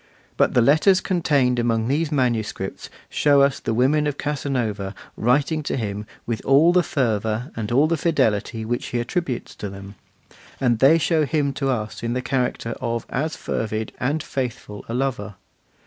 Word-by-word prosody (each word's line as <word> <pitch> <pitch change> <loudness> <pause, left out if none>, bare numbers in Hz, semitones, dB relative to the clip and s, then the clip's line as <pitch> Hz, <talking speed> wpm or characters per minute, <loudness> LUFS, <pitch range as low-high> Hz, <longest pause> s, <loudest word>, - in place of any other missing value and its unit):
But - - +2
the 120 - +5
letters 155 - +5
contained 145 -10 +1
among 115 -1 +1
these 150 +4 0
manuscripts 115 -8 -1 0.2
shows 145 -2 +4
us 140 0 -1
the - - -3
women 140 +6 +2
of 145 -1 -2
Casanova 120 -9 -2 0.2
writing 140 +6 +1
to 145 - -2
him 105 -2 -4 0.2
with 115 -2 -3
all 150 +6 +5
the 180 - +5
fervour 115 -3 -1
and 110 -1 -4
all 135 +5 +4
the 165 +1 +1
fidelity 110 -8 0
which 120 +2 -2
he 120 - -2
attributes 125 +1 -3
to 105 - -5
them; 100 0 -10 0.7
and 120 -4 +2
they 140 +6 +6
show 160 0 +2
him 145 -1 0
to 135 0 -2
us 110 -5 -3
in 115 0 -2
the 125 - -1
character 125 -2 -1
of 115 -1 -2
as 155 +5 -1
fervid 110 0 -3
and 145 +4 -1
faithful 120 -7 -5
a 115 - -2
lover. 125 -7 -2
125 Hz, 170 wpm, -22 LUFS, 110-145 Hz, 0.7 s, they